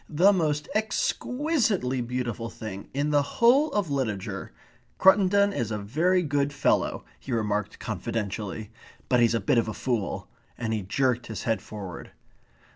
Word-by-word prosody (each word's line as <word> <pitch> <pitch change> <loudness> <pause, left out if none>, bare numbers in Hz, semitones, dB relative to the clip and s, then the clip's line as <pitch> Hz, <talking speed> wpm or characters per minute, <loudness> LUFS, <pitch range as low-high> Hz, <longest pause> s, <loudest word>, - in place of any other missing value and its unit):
"The 180 +6 +5
most 150 -5 0
ex 215 0 +1
qui 295 +6 -2
sitely 155 - +1
beautiful 120 -2 -3
thing 100 -4 -8
in 145 +2 -1
the 145 -1 +4
whole 245 - +3
of 200 -7 -1
literature.... 110 -9 -3 0.5
Cruttendon 200 +1 +5
is 120 - -2
a 105 - -2
very 165 - +1
good 145 -2 0
fellow," 145 - +1
he 135 - -8
remarked 105 -3 -1
confidentially. 105 0 -4 0.4
"But 125 - +4
he's 115 -1 +4
a - - +2
bit 110 +4 +2
of 115 - 0
a 110 - -4
fool." 120 -6 -2 0.3
And 110 -2 -2
he 110 - -1
jerked 120 +4 0
his 110 - -5
head 115 -1 0
forward. 95 -6 -8
125 Hz, 160 wpm, -27 LUFS, 110-180 Hz, 0.5 s, The